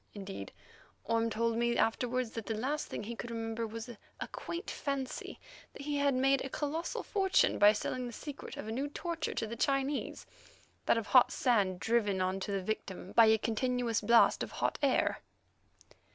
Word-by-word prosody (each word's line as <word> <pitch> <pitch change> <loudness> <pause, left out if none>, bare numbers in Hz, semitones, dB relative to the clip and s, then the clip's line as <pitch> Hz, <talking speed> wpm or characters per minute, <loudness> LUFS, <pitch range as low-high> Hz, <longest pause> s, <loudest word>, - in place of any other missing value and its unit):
Indeed, 195 - -7 0.5
Orme 230 +1 +1
told 230 +1 0
me 235 0 +1
afterwards 245 +1 0
that 225 -2 -6
the 225 - -1
last 285 +7 -2
thing - - -5
he 235 +3 -5
could 240 - -6
remember 225 0 -3
was 225 +2 -7
a 235 -3 -9
quaint 340 +3 -5
fancy 275 -2 -4 0.3
that 280 - -9
he 290 0 -1
had 280 -2 +2
made 270 +1 +3
a 270 - -4
colossal 310 +5 -3
fortune 385 -3 +2
by 205 +1 +8
selling 250 +3 -3
the - - -6
secret 285 +5 -8
of - - -6
a - - -3
new 265 +5 -1
torture 330 +2 -4
to - - -1
the 225 +2 -5
Chinese—that 275 -2 -2
of 225 - -1
hot 250 +3 +6
sand 200 -8 +2
driven 210 -3 +1
on 185 +1 0
to 195 - -4
the 195 -1 -1
victim 190 -2 -4
by 230 -1 +7
a 220 0 +6
continuous 235 +1 0
blast 230 +2 +5
of - - -4
hot - - -1
air. 275 -3 +2
235 Hz, 180 wpm, -32 LUFS, 220-270 Hz, 0.5 s, by